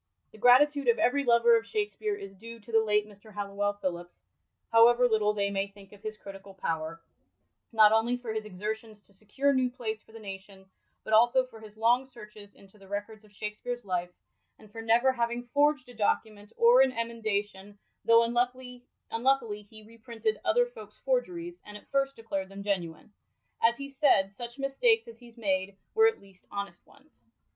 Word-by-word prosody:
The 215 - -16
gratitude 280 +4 +5
of 235 - +4
every 280 +4 +2
lover 235 -1 +5
of 230 0 0
Shakspere 420 - -2
is 195 - -9
due 230 +4 -11
to 210 - -13
the 225 0 +4
late 210 -1 +1
Mr. 210 +1 -16
Halliwell 205 0 -2
Phillips 175 -3 -6 0.2
— - - -41
^however 240 +2 +6
little 215 -2 +2
they 200 -1 -1
may 195 0 -1
think 200 -1 -17
of 205 -1 -16
his 215 0 -6
critical 195 -1 -11
power— 165 -2 -4 0.7
not 215 -2 +6
only 225 +3 +2
for 240 -3 -5
his 220 0 -3
exertions 215 +2 -6
to 200 - -23
secure 240 +8 0
New 260 -1 +2
Place 225 -4 -5
for - - -22
the 225 - -11
nation, 195 -1 -10 0.4
but 220 - -4
also 240 +4 +5
for 230 -3 -14
his 215 -1 -14
long 240 +4 +3
searches 210 -4 -13
into 195 +1 -20
the 195 - -16
records 205 +2 -6
of 210 - -20
Shakspeve's 210 +3 -6
life, 180 -2 -2 0.5
and 215 - -18
for 225 - -7
never 230 +4 +4
having 235 -1 -2
forged 290 -2 +2
a 245 - -12
document 210 -1 -1
or 240 +2 +6
an 265 -1 +3
emendation, 210 -4 -3 0.3
though 230 0 +6
imluckily 245 -1 -2
he 215 -1 -13
reprinted 230 - -4
other 485 0 +3
folk's - - -13
forgeries, 355 -9 -2
and 210 0 -10
at - - -20
first 275 0 +1
declared 195 -4 -4
them 195 0 -9
genuine. 185 -1 -3 0.5
As 235 +1 +3
he 275 - -6
said, 270 -9 +2
such 240 +5 -9
mistakes 365 - +2
as 230 0 -12
he's 240 -1 -16
made, 195 -2 -1 0.2
were 445 0 +6
at 450 - 0
least 195 -2 -20
honest 200 -4 -7
ones. 280 +2 -23
225 Hz, 185 wpm, -29 LUFS, 205-245 Hz, 0.7 s, ^however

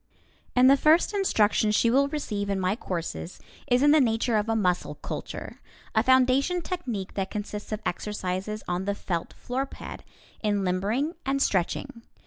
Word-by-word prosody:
And 250 0 +6
the 275 +1 +7
first 315 +8 +4
instruction 220 - +2
she 230 +2 +3
will 275 +3 +4
receive 215 -9 -3
in 195 -1 0
my 185 +2 +1
courses 175 -4 -5 0.3
is 250 +2 +3
in 290 - +6
the 305 -1 +6
nature 230 -1 +1
of 210 +1 +1
a 225 - +2
muscle 180 -5 0
culture, - - -7 0.3
a 220 - +4
foundation 260 +7 +3
technique 245 - -4
that 195 -1 -2
consists 210 0 -5
of 215 0 -3
exercises, 195 +2 -3
on 180 +1 -2
the 200 0 -1
felt 170 -4 -4
floorpad, 265 +2 -5 0.4
in 205 -2 +1
limbering 205 - 0
and 270 +1 0
stretching. 200 +1 -1
220 Hz, 160 wpm, -27 LUFS, 195-270 Hz, 0.4 s, the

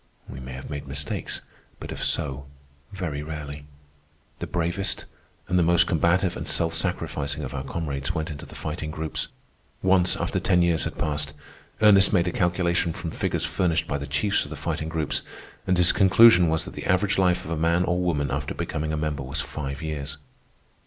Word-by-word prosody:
We 65 - -8
may 65 0 -7
have 65 +1 -7
made 70 -1 -6
mistakes, 70 +1 -3 0.4
but - - -7
if - - -4
so, 70 0 -1 0.4
very 90 -7 -3
rarely. 75 -2 -6 0.7
The - - -4
bravest, 90 +3 -1 0.4
and 90 -1 +2
the - - +4
most 85 +1 +5
combative 85 +2 +2
and - - -5
self 80 -1 +2
sacrificing 80 -4 -1
of 65 - -5
our 70 -1 -3
comrades 70 -1 -3
went 80 0 -2
into 75 -1 -8
the - - -12
Fighting 75 0 -4
Groups. 80 0 -3 0.6
Once, 95 -1 +4
after - - -1
ten 90 -2 +3
years 85 -2 +2
had - - -5
passed, 75 -3 -1 0.5
Ernest 100 -2 +7
made 90 -2 +3
a - - +1
calculation 85 -1 +1
from 85 0 -5
figures - - -1
furnished 85 -3 0
by 70 - -1
the 70 - -5
chiefs 75 +9 +1
of - - -9
the - - -6
Fighting 80 - -3
Groups, 80 -2 -1 0.5
and 90 -1 +3
his 90 -1 +5
conclusion 95 -2 +7
was 80 0 0
that - - -8
the - - -6
average 95 +2 +2
life 90 -1 +2
of 80 - -6
a - - +1
man 85 +2 +2
or 90 0 +1
woman 80 -6 0
after 70 +1 -2
becoming 75 +1 -2
a 80 - -1
member 75 -2 -2
was 70 +3 -4
five 70 +1 -4
years. 75 -2 -4
80 Hz, 195 wpm, -25 LUFS, 75-90 Hz, 0.7 s, Ernest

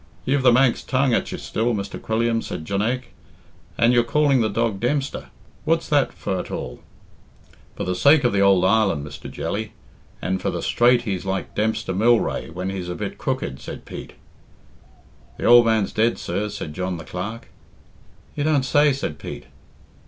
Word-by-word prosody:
"You've 140 +1 +2
the 125 -1 +6
Manx 125 0 +3
tongue 130 -1 +1
at - - 0
you - - -4
still, 115 +1 -1
Mr. 100 -1 -5
Quilliam," 115 +1 0
said 80 - -6
Jonaique; 115 +7 -2 0.6
"and 120 +1 +4
you're 120 -1 +4
calling 140 +1 +2
the 110 - +1
dog 110 -1 -1
Dempster; 135 +4 -1 0.4
what's 165 +1 +1
that 145 -3 +3
for 95 - -3
at - - -6
all?" 60 - -6 0.9
"For 90 - -2
sake 140 - +5
of 120 - +2
the 100 - +2
ould 95 -2 +5
island, 95 -7 +2
Mr. 75 -1 -9
Jelly, 110 +1 -4 0.5
and 95 0 -2
for - - -1
the - - -4
straight 120 0 +3
he's 95 -6 -3
like 95 0 -3
Dempster 110 -2 -1
Mylrea 115 -3 +2
when 90 +3 -4
he's 90 -2 -5
a 90 - -3
bit - - -5
crooked," 65 - -3
said - - -9
Pete. - - -9 1.2
"The - - -4
old 120 -1 +7
man's 110 -3 +1
dead, 115 +2 +2
sir," 105 +1 -3
said 75 -6 -6
John 90 +1 -3
the 85 - -8
Clerk. 105 +6 -6 0.8
"You 145 - -2
don't 150 -3 +2
say?" 145 +2 +4
said 80 - -4
Pete. - - -8
110 Hz, 175 wpm, -22 LUFS, 95-125 Hz, 1.2 s, old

